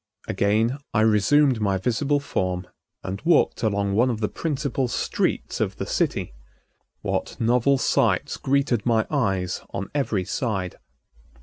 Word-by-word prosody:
Again 110 +6 +1 0.2
I 105 - +4
resumed 115 +4 +4
my 100 -2 +1
visible 135 +8 0
form 90 -9 -2 0.4
and 95 +3 -5
walked 170 +5 +3
along 100 -2 0
one 120 +5 +3
of 115 -3 -2
the 105 - -1
principal 140 -4 -2
streets - - -1
of - - -1
the - - -4
city. - - -1 0.7
What - - -3
novel 125 +4 +3
sights - - +1
greeted 135 -5 +1
my 115 -2 +2
eyes 95 -10 0
on 100 0 -5
every 115 -10 0
side! 95 -7 -3
115 Hz, 135 wpm, -24 LUFS, 100-135 Hz, 0.7 s, I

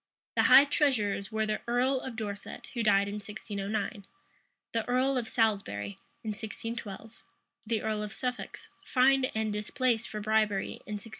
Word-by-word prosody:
The - - +4
high 275 - +10
treasurers 230 -9 +1
were 220 0 +1
the 215 0 -1
earl 255 +3 +2
of 260 -3 -6
Dorset, 205 -2 -6
who 240 - -1
died 200 -2 +4
in 205 +1 -4
1609, 205 0 -4 0.7
the 225 -1 +1
earl 260 +2 +2
of 245 -3 -1
Salisbury, 195 - 0 0.2
in 220 - -3
1612; 220 0 -6 0.4
the 225 -1 0
earl 215 -1 -1
of 210 0 -4
Suffolk, 250 +2 -4 0.3
fined 260 0 +4
and 220 -1 0
displaced 225 +2 0
for 215 - -4
bribery 210 -2 +1
in 210 - -4
1618. 210 +2 -6
220 Hz, 155 wpm, -30 LUFS, 205-245 Hz, 0.7 s, high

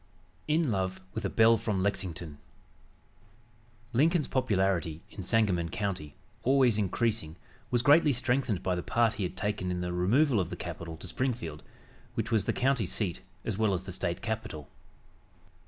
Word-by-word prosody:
IN 155 -3 +2
LOVE 95 -2 -1
WITH 110 - -3
A - - +1
BELLE 115 0 +5
FROM 105 -4 -1
LEXINGTON 85 -6 -3 1.5
Lincoln's 155 +5 +3
popularity 95 - 0
in 100 - -7
Sangamon 95 -4 +1
County, 90 -5 -3 0.3
always 130 -4 +4
increasing, 105 -4 0 0.3
was 120 -1 +1
greatly 150 +2 +6
strengthened 125 -5 0
by 95 - +1
the 90 - -1
part 115 +2 +2
he 105 - -3
had 95 - -16
taken 105 -3 -1
in 90 0 -2
the 90 0 -2
removal 115 - +3
of 90 - -1
the - - -4
capital 85 -1 -6
to - - -8
Springfield, 115 - -2 0.5
which - - -2
was 110 -4 +2
the - - +2
county 125 -6 +1
seat 95 -4 -2 0.2
as 105 -2 -2
well 110 -3 +3
as 90 0 -2
the 95 - -6
State 85 -1 -3
capital. 110 -9 -4
105 Hz, 160 wpm, -30 LUFS, 90-120 Hz, 1.5 s, greatly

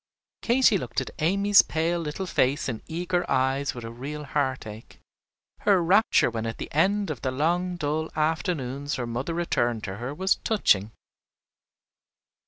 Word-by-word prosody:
Katy 235 -4 +4
looked - - -3
at - - -5
Amy's 200 +5 +5
pale 165 +2 -1
little 165 +4 -4
face 140 -4 +1
and 115 -4 -4
eager 175 +2 -1
eyes 135 +2 +1
with 120 - -7
a 115 - -6
real 140 +6 -6
heartache. 130 -7 -4 0.6
Her 195 -4 +3
rapture 190 - +4
when 115 0 -3
at 115 - -5
the - - -7
end 195 +4 +2
of 140 - -6
the 130 - -1
long 175 +7 0
dull 155 0 -2
afternoons 150 -3 -1
her 125 - -3
mother 125 +8 -3
returned 120 -10 0
to 95 0 -5
her 125 +4 -5
was 190 +6 +1
touching. 110 - +2
150 Hz, 155 wpm, -26 LUFS, 130-175 Hz, 0.6 s, Amy's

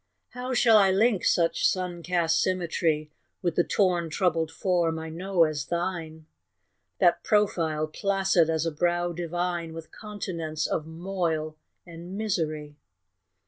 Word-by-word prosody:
How 250 +1 -4
shall 225 -2 +6
I 195 -1 +5
link 200 +1 +2
such 165 -1 +2
sun 180 -2 0
cast 165 -2 +1
symmetry 165 -4 0 0.3
With 175 - +1
the 175 - +3
torn 175 -4 +1
troubled 165 -1 0
form 170 -2 0
I 160 0 -6
know 180 +2 +1
as 155 -3 -1
thine, 170 -3 -3 0.7
That - - +3
profile, 165 -8 +1
placid 190 0 +1
as 160 0 0
a 165 - 0
brow 175 +2 0
divine, 175 0 -3
With 165 0 -9
continents 170 -7 -4
of 155 - -2
moil 165 -2 -2 0.3
and 175 +2 -9
misery? 155 -8 -2
170 Hz, 135 wpm, -27 LUFS, 160-185 Hz, 0.7 s, shall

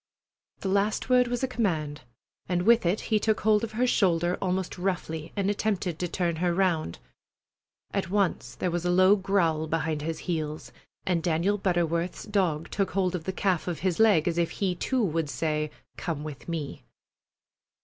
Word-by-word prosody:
The - - -3
last 200 +5 +1
word 250 -1 +5
was 245 +1 -2
a - - +2
command, 160 - -1 0.5
and 175 -1 +1
with 230 -2 +5
it 185 +5 +1
he 215 - +5
took 215 0 +1
hold 215 +1 +3
of 225 - -4
her 240 +3 +2
shoulder 175 -7 +2
almost 185 -1 -2
roughly 165 -4 -2
and 200 -2 0
attempted 200 -5 -1
to 180 - -1
turn 170 -1 -1
her 175 0 +1
round. 170 - +1 1.0
At 190 -3 -1
once 200 -1 0
there 180 - -1
was 175 0 -2
a 175 - 0
low 185 +3 +6
growl 180 -6 +1
behind 155 -1 -1
his 160 +1 -3
heels, 155 -3 -3 0.3
and 175 -3 +1
Daniel 175 +5 +1
Butterworth's 175 -2 0
dog 185 -7 0
took 195 -1 0
hold 190 -2 +1
of 170 -3 -4
the 190 - -1
calf 185 -3 0
of 175 -3 -3
his 185 -1 0
leg 205 -8 +5
as 170 0 +1
if 170 0 +1
he 190 +2 -1
too 250 +7 0
would 165 -5 0
say, 155 0 -1 0.3
"Come 155 -4 -3
with 150 0 -8
me!" 160 -4 -4
180 Hz, 180 wpm, -27 LUFS, 165-200 Hz, 1.0 s, low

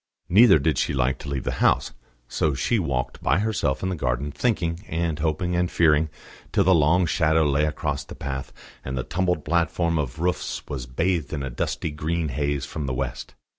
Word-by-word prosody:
Neither 100 0 +7
did 75 0 +1
she - - 0
like 65 0 +1
to 70 - -7
leave 70 -3 -2
the - - -1
house; - - +3 0.4
so 75 +2 0
she 115 - +1
walked 70 -8 -2
by - - +2
herself 100 -10 0
in 95 - 0
the 95 - -1
garden, 65 0 -1
thinking 85 - -1
and 80 -1 -2
hoping 80 +3 0
and 90 0 +1
fearing, 80 -1 +3 0.4
till 100 - +3
the 95 +1 +5
long 85 +3 +4
shadow 80 -2 +2
lay 75 0 +2
across 75 -2 -2
the - - -10
path, 65 -1 -5 0.3
and 65 0 -4
the 65 - -1
tumbled 90 -1 -1
platform 85 0 +1
of 70 -3 -3
roofs 90 +2 -2
was 65 -4 -5
bathed 85 +4 -1
in 70 -2 -2
a 65 - -4
dusty 65 +5 -2
green 80 +2 -2
haze 70 0 -1
from 75 -3 -5
the 65 - -2
west. 65 -1 -4
80 Hz, 200 wpm, -24 LUFS, 70-85 Hz, 0.4 s, Neither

